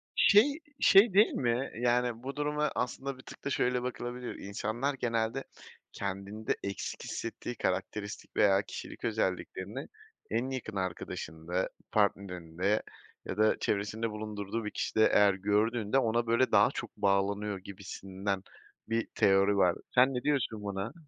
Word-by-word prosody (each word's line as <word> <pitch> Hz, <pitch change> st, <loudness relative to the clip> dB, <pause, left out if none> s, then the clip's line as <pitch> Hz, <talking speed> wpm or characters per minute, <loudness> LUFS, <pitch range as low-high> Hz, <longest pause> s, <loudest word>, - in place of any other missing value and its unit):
Şey, 280 Hz, +9 st, +5 dB, 0.2 s
şey 195 Hz, 0 st, +7 dB
değil 210 Hz, +3 st, +6 dB
mi? 120 Hz, +1 st, 0 dB
Yani, 120 Hz, -1 st, +1 dB
bu 135 Hz, +2 st, -5 dB
duruma 150 Hz, 0 st, 0 dB
aslında 130 Hz, +2 st, -2 dB
bir -, -, -12 dB
tık -, -, -13 dB
da 140 Hz, -, -1 dB
şöyle 125 Hz, -2 st, +1 dB
bakılabilir: 125 Hz, 0 st, -4 dB
İnsanlar 110 Hz, +7 st, -2 dB
genelde, 115 Hz, 0 st, -1 dB, 0.5 s
kendinde 100 Hz, +2 st, -3 dB
eksik 100 Hz, 0 st, -4 dB
hissettiği 115 Hz, +1 st, -5 dB
karakteristik 100 Hz, 0 st, -3 dB
veya 100 Hz, -1 st, +5 dB
kişilik -, -, -8 dB
özelliklerini 105 Hz, -5 st, -2 dB, 0.4 s
en 120 Hz, +4 st, 0 dB
yakın 120 Hz, -5 st, -5 dB
arkadaşında, 90 Hz, -1 st, -3 dB, 0.2 s
partnerinde 95 Hz, -1 st, 0 dB, 0.4 s
ya 95 Hz, -, -4 dB
da 110 Hz, 0 st, +4 dB
çevresinde 110 Hz, +2 st, -1 dB
bulundurduğu 105 Hz, +1 st, -4 dB
bir 105 Hz, -, -3 dB
kişide 110 Hz, -, +2 dB
eğer 100 Hz, -2 st, +6 dB
gördüğünde, 105 Hz, +4 st, +1 dB
ona 115 Hz, -1 st, +1 dB
böyle, 115 Hz, +3 st, +2 dB
daha -, -, +6 dB
çok -, -, -6 dB
bağlanıyor 100 Hz, +1 st, +1 dB
gibisinden 95 Hz, 0 st, -5 dB, 0.5 s
bir 115 Hz, 0 st, 0 dB
teori 100 Hz, +1 st, +4 dB
var. 90 Hz, -3 st, +4 dB, 0.2 s
Sen 130 Hz, +2 st, +5 dB
ne 125 Hz, -, -2 dB
diyorsun 130 Hz, -7 st, 0 dB
buna? 100 Hz, +3 st, -3 dB
110 Hz, 135 wpm, -31 LUFS, 100-125 Hz, 0.5 s, şey